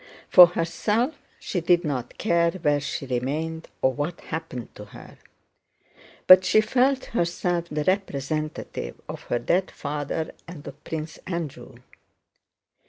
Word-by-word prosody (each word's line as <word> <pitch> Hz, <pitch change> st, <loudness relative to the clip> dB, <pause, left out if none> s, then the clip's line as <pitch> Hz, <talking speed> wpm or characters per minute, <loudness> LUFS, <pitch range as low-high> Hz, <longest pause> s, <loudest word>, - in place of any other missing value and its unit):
For 180 Hz, -1 st, +10 dB
herself 210 Hz, -, 0 dB, 0.3 s
she 180 Hz, -, -3 dB
did 175 Hz, +1 st, +3 dB
not 130 Hz, -5 st, -3 dB
care 170 Hz, -4 st, +2 dB
where 150 Hz, -6 st, +1 dB
she 140 Hz, -1 st, -4 dB
remained 150 Hz, +6 st, -3 dB, 0.2 s
or 130 Hz, -, +4 dB
what 150 Hz, +5 st, -3 dB
happened 160 Hz, -7 st, -6 dB
to 105 Hz, -, -10 dB
her, 105 Hz, -, -14 dB, 1.1 s
but 185 Hz, 0 st, +9 dB
she 215 Hz, -, +4 dB
felt 255 Hz, +4 st, +2 dB
herself 175 Hz, -2 st, 0 dB
the 150 Hz, 0 st, -2 dB
representative 155 Hz, -, -2 dB
of -, -, -7 dB
her -, -, 0 dB
dead 180 Hz, +10 st, 0 dB
father 145 Hz, +2 st, -4 dB, 0.2 s
and 165 Hz, -4 st, -10 dB
of 140 Hz, +2 st, -10 dB
Prince 160 Hz, 0 st, -5 dB
Andrew. 170 Hz, -6 st, -5 dB
160 Hz, 130 wpm, -25 LUFS, 145-180 Hz, 1.1 s, For